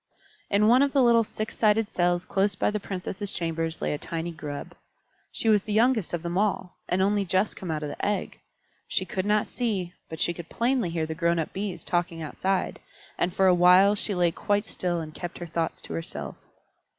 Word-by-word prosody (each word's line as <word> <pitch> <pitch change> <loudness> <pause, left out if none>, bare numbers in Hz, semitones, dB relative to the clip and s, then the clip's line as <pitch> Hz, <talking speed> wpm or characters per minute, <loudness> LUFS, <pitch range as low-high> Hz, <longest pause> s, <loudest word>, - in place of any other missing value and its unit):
In 205 +1 +3
one 245 +3 +6
of 280 -1 +2
the 275 -3 +4
little 235 -1 +5
six 215 0 -5
sided 215 -1 +2
cells 175 0 +1
close 195 +1 +1
by 190 - +1
the 210 - -2
Princesses' 195 +1 -4
chambers 165 -1 -3
lay - - 0
a - - 0
little 145 - -6
tiny 165 +1 -3
Grub. 150 -3 -7 0.6
She - - -2
was 210 -2 +5
the 210 - -4
youngest 225 -3 +3
of 175 -1 -3
them 175 +2 -1
all, 200 -3 -1
and 190 +1 +2
only 205 +1 +2
just 190 +2 +1
come 185 - -7
out 155 -1 -2
of 150 - -3
the - - -7
egg. 205 -1 -1 0.5
She - - 0
could 195 -4 -3
not 210 0 +3
see, 200 -8 -2 0.2
but 160 - -7
she 175 - +1
could 170 -1 -9
plainly 240 -5 +1
hear 165 -1 -1
the 160 - -4
grown 170 +1 +1
up 160 - -2
Bees 195 -3 -4
talking 175 -1 -1
outside, 185 +4 -2 0.4
and 180 - +1
for 190 +2 +2
a 185 - +6
while 180 +3 +6
she 205 -1 0
lay 175 -1 +3
quite 205 +4 0
still 175 -5 -2
and 155 -1 -8
kept 175 +1 -6
her 175 - -6
thoughts 165 0 -2
to - - -6
herself. 80 0 -5
185 Hz, 220 wpm, -26 LUFS, 170-210 Hz, 0.6 s, one